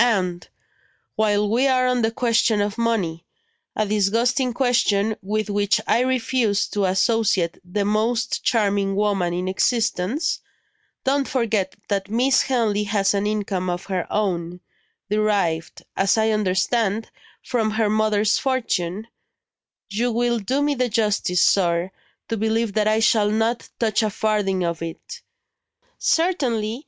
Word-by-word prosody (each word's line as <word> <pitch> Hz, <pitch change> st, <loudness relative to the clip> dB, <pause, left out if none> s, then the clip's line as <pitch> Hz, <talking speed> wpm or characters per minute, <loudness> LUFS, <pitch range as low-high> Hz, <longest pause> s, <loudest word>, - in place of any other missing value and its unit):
And, 185 Hz, -7 st, 0 dB, 0.7 s
while 210 Hz, -1 st, +2 dB
we 240 Hz, +6 st, +2 dB
are 255 Hz, -1 st, +2 dB
on 250 Hz, -1 st, +1 dB
the 225 Hz, -, +2 dB
question 230 Hz, -2 st, +1 dB
of 205 Hz, 0 st, -1 dB
money 195 Hz, -8 st, -1 dB, 0.5 s
(a 215 Hz, -, +1 dB
disgusting 230 Hz, +6 st, +1 dB
question, 225 Hz, -4 st, +1 dB
with 215 Hz, +2 st, -2 dB
which 205 Hz, -1 st, +1 dB
I -, -, +2 dB
refuse 250 Hz, -4 st, +1 dB
to 205 Hz, -2 st, 0 dB
associate 190 Hz, -2 st, +1 dB
the 200 Hz, +3 st, -2 dB
most 220 Hz, +3 st, 0 dB
charming 200 Hz, -3 st, +1 dB
woman 200 Hz, -4 st, 0 dB
in 180 Hz, +1 st, -3 dB
existence), 220 Hz, -, 0 dB, 0.6 s
don't 275 Hz, +1 st, +1 dB
forget 220 Hz, -7 st, -1 dB
that 200 Hz, -1 st, -2 dB
Miss 250 Hz, +4 st, +3 dB
Henley 220 Hz, -5 st, 0 dB
has 205 Hz, -1 st, +1 dB
an 200 Hz, +1 st, 0 dB
income 200 Hz, -3 st, -2 dB
of 175 Hz, +1 st, -3 dB
her 180 Hz, -, -3 dB
own; 180 Hz, -4 st, -2 dB, 0.5 s
derived, 200 Hz, -7 st, 0 dB
as 195 Hz, +3 st, +2 dB
I 220 Hz, 0 st, +2 dB
understand, 210 Hz, +2 st, 0 dB, 0.3 s
from 225 Hz, -3 st, 0 dB
her 215 Hz, 0 st, 0 dB
mother's 215 Hz, 0 st, +2 dB
fortune, 220 Hz, -7 st, -1 dB, 0.9 s
You 235 Hz, +4 st, 0 dB
will 240 Hz, 0 st, 0 dB
do 260 Hz, +8 st, -1 dB
me 290 Hz, 0 st, +1 dB
the 250 Hz, -2 st, -1 dB
justice, 210 Hz, -5 st, +1 dB
sir, 175 Hz, -1 st, +2 dB, 0.4 s
to 225 Hz, -, -2 dB
believe 220 Hz, 0 st, 0 dB
that 215 Hz, 0 st, +1 dB
I 215 Hz, +1 st, +2 dB
shall 215 Hz, -2 st, +3 dB
not 225 Hz, +2 st, -1 dB
touch 225 Hz, -1 st, +1 dB
a 215 Hz, -, +1 dB
farthing 205 Hz, -3 st, 0 dB
of 170 Hz, -1 st, -2 dB
it." 165 Hz, -1 st, -7 dB, 0.8 s
"Certainly! 250 Hz, -10 st, 0 dB
215 Hz, 140 wpm, -22 LUFS, 195-230 Hz, 0.9 s, Miss